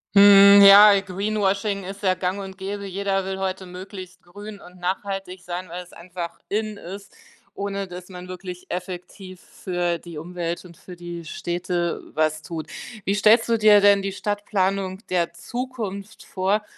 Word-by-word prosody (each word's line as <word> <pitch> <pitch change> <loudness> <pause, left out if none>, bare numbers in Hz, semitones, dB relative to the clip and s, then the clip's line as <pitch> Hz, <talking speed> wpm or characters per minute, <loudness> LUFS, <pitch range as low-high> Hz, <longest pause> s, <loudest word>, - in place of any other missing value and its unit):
Mhm, 200 0 +9
ja, 200 0 +9
Greenwashing 200 +1 -1
ist 195 +2 -8
ja 185 -2 +2
gang 185 +2 -2
und 190 -1 -8
gäbe, 200 +1 -5
jeder 195 0 -1
will 190 0 -4
heute 190 0 -3
möglichst 185 0 -10
grün 205 +3 -10
und 180 -1 -15
nachhaltig 190 0 -4
sein, 180 0 -6
weil's 180 +1 -8
einfach 170 0 -7
in 215 0 -2
ist, 200 +2 -10 0.4
ohne 200 0 -4
dass 180 0 -10
man 180 -1 -9
wirklich 180 0 -8
effektiv 185 +1 -7
für 175 -3 -3
die 170 -2 -10
Umwelt 170 +2 -5
und 170 -2 -14
für 180 - -12
die 175 -1 -8
Städte 175 +1 -3
was 155 0 +1
tut. 160 0 -7 0.3
Wie 195 - +1
stellst 215 +3 +4
du 230 - +3
dir 210 -1 +7
denn 200 0 +5
die 195 0 -3
Stadtplanung 195 -1 -2
der 175 -2 +1
Zukunft 215 +1 -6
vor, 195 +3 0
190 Hz, 155 wpm, -23 LUFS, 180-200 Hz, 0.4 s, Mhm